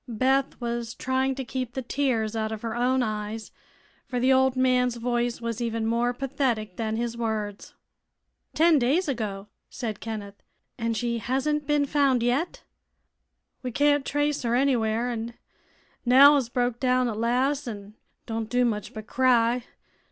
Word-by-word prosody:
Beth 260 +4 +1
was 235 -1 -3
trying 260 +1 0
to 265 -1 -5
keep 255 -1 -4
the 265 - -3
tears 235 -5 0
out 220 0 -1
of 220 0 -6
her 230 -1 -3
own 250 +2 +2
eyes, 215 0 -4 0.6
for 250 - -2
the 260 +2 +4
old 265 0 +3
man's 250 -1 +2
voice 240 0 -1
was 230 0 -4
even 230 -1 -1
more 235 +2 +1
pathetic 245 -6 -2
than 220 -1 -2
his 235 0 -2
words. 215 -3 -4 0.8
"Ten 325 -1 +5
days 290 +9 +2
ago!" 210 -7 -3 0.2
said 220 -5 -5
Kenneth. 205 -3 -7 0.3
"And 230 -2 -2
she 235 +1 -1
hasn't 275 +5 -1
been 295 -1 +2
found 275 -4 +2
yet?" 285 - -1 1.0
"We 255 - -3
can't 290 +2 +3
trace 290 +1 0
her 235 -1 0
anywhere, 245 -3 +1
an' 230 0 -5 0.7
Nell 270 +4 +8
has 270 -5 +1
broke 245 -1 -1
down 255 -1 +2
at 225 - -2
las', 255 +5 0
an' 205 -2 -7 0.3
don't 225 -1 -4
do 250 0 +2
much 210 -3 -3
but 215 -1 -7
cry. 245 -1 +2
245 Hz, 160 wpm, -26 LUFS, 225-265 Hz, 1.0 s, Nell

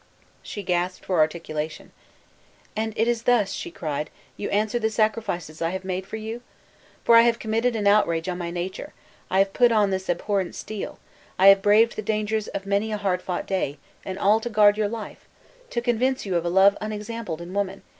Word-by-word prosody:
She 205 - -7
gasped 180 0 -1
for 180 -3 0
articulation. 155 -1 -2 0.8
"And 220 +1 -1
it 225 - +2
is 240 -1 +1
thus," 230 -4 +1
cried 150 -1 -3 0.3
she, - - -9
"you - - -2
answer 215 +3 0
the 220 -1 +1
sacrifices 215 -8 -1
I 165 - +1
have 190 +1 -5
made 190 0 -3
for - - -6
you? 220 +2 -6 0.6
For 235 - +4
you - - +9
I - - +3
have 235 -1 +3
committed 230 +2 0
an 210 -2 -2
outrage 170 -5 +3
on 180 -1 -3
my 170 -1 -3
nature; 175 +2 -5 0.4
I 190 - 0
have 195 0 +3
put 245 -1 +4
on 210 -3 +3
me 190 - +1
this 190 0 -12
abhorrent 190 +1 -1
steel; 215 -2 -6 0.4
I 195 +1 +8
have 195 0 +7
braved 215 +3 +4
the - - -1
dangers 215 0 -1
of 195 0 -5
many 200 +2 0
a 210 - -1
hard 190 -3 -1
fought 180 -1 -3
day, 185 -7 -2 0.3
and 190 0 -5
all 210 +3 +4
to 240 - -4
guard 210 -2 +5
your 210 -1 0
life! 225 -1 -8 0.4
to 235 - -2
convince 245 +2 0
you 190 -3 -2
of 170 0 0
a - - +1
love 195 +3 +5
unexampled 210 -4 -5
in 170 +2 -8
woman! 195 -1 -2
200 Hz, 210 wpm, -24 LUFS, 180-220 Hz, 0.8 s, you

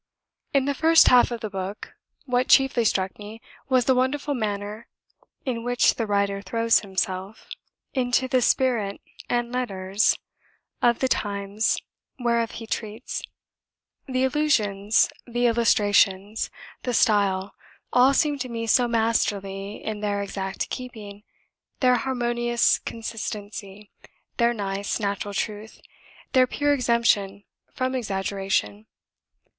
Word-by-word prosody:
In 275 -2 +2
the 285 - 0
first 325 +3 +6
half 250 -1 +6
of 235 -1 -5
the 215 - -4
book, 195 +1 -6 0.3
what 250 -1 +1
chiefly 270 -3 +4
struck 190 -2 0
me 210 +2 -9 0.3
was 255 -2 +3
the 260 - +4
wonderful 265 +3 0
manner 210 -2 -4 0.6
in 235 -3 -2
which 245 0 +3
the 230 - -3
writer 200 -1 0
throws 230 +3 +2
himself 190 +1 -4 0.5
into 255 0 +1
the 255 -1 +2
spirit 230 -6 +1 0.3
and 240 0 0
letters 200 -5 0 0.6
of 235 -1 +4
the 260 - +3
times 205 -2 0 0.4
whereof 235 -2 +1
he 230 - -7
treats; 220 +2 -4 0.9
the 255 -1 0
allusions, 220 -8 +2 0.2
the 240 0 0
illustrations, 205 -3 +2 0.3
the 245 -2 -2
style, 200 -3 +2 0.4
all 250 +2 +6
seem 295 -1 +1
to 255 -1 -4
me 230 -1 -3
so 245 +2 +3
masterly 205 -3 -1
in 215 -1 -3
their 205 -1 -1
exact 195 -1 -4
keeping, 215 -6 -7 0.6
their 250 -1 +4
harmonious 240 -2 +1
consistency, 210 -2 -7 0.5
their 235 -1 +3
nice, 200 -2 -3
natural 200 -1 -3
truth, 215 +1 -4 0.5
their 255 -1 +5
pure 290 +3 +1
exemption 230 -6 +1 0.3
from 255 0 -1
exaggeration. 195 - -2
225 Hz, 120 wpm, -24 LUFS, 200-250 Hz, 0.9 s, first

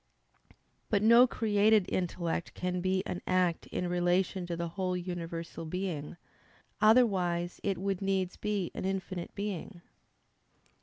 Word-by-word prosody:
But 205 -1 +2
no 235 +3 +8
created 215 -3 +3
intellect 170 -2 -2
can 180 0 -2
be 185 +1 +1
an 180 - -4
act 180 -2 +1
in 180 - -3
relation 180 +1 +1
to 170 -1 -3
the 170 0 -3
whole 185 +1 -2
universal 170 -2 -5
being; 170 -2 -4 0.6
otherwise 185 -7 +3
it 195 -1 -1
would 195 0 -2
needs 190 -2 0
be 205 -4 -2
an - - -5
infinite 185 -2 -3
being. 200 -2 -5
185 Hz, 125 wpm, -31 LUFS, 175-200 Hz, 0.6 s, no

